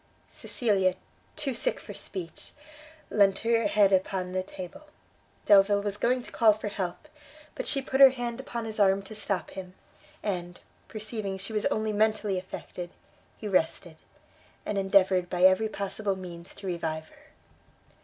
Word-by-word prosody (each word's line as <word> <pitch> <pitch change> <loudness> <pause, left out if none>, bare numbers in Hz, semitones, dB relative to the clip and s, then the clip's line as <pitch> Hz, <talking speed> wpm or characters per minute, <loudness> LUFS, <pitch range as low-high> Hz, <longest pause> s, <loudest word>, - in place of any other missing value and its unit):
Cecilia, 195 -6 +1 0.4
too 290 -4 -1
sick - - -1
for - - -9
speech, 170 -4 -7 0.6
leant 195 -2 +4
her 230 -1 +2
head 200 -1 +4
upon 185 -1 0
a 185 - 0
table. 185 - -9 0.6
Delvile 200 0 +5
was 205 -1 -2
going 250 +3 +1
to - - -10
call 220 -2 +5
for 210 0 -5
help; 190 - -4 0.5
but - - -5
she 275 -2 0
put 265 0 -1
her 270 - +12
hand 245 -2 -4
upon 240 -4 -5
his 220 -1 -5
arm 195 -1 +4
to 195 - -10
stop 205 -2 -2
him, 185 -1 -8 0.5
and, 175 -3 -3 0.3
perceiving 215 -2 -4
she 200 +3 -6
was 210 - +1
only 215 0 -1
mentally 215 -2 +1
affected, 180 -1 -7 0.5
he 215 - -6
rested, 170 -3 0 0.7
and 205 - -1
endeavoured 190 -2 +3
by 180 +1 -1
every 190 +4 +5
possible 200 0 -2
means 175 -2 -9
to 200 - -10
revive 160 -3 -3
her. - - -21
200 Hz, 155 wpm, -28 LUFS, 185-220 Hz, 0.7 s, her